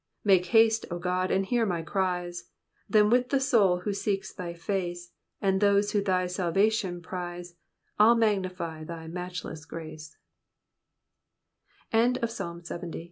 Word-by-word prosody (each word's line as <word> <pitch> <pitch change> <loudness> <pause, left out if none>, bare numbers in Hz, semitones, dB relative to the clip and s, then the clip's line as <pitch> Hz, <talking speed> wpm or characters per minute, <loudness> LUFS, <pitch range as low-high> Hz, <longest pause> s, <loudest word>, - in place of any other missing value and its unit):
Make 190 -3 +4
haste, 225 +3 +4
O 175 - -3
God, 180 +1 -1
and 195 0 +1
hear 240 +3 +1
my 175 -6 -1
cries; 180 -1 -2 0.4
Then 210 +1 +4
with 250 +1 +3
the 275 - +2
souls 200 -9 +3
who 205 - -1
seek 195 0 -1
thy 175 -3 -5
face. 175 -1 -3 0.3
And 190 -1 +1
those 205 0 +3
who 205 - +2
thy 185 -2 +1
salvation 185 +1 0
prize, 175 0 -6 0.5
I'll 225 +3 +7
magnify 185 -7 -1
thy 165 0 -7
matchles 170 -2 -6
185 Hz, 120 wpm, -28 LUFS, 175-205 Hz, 0.5 s, I'll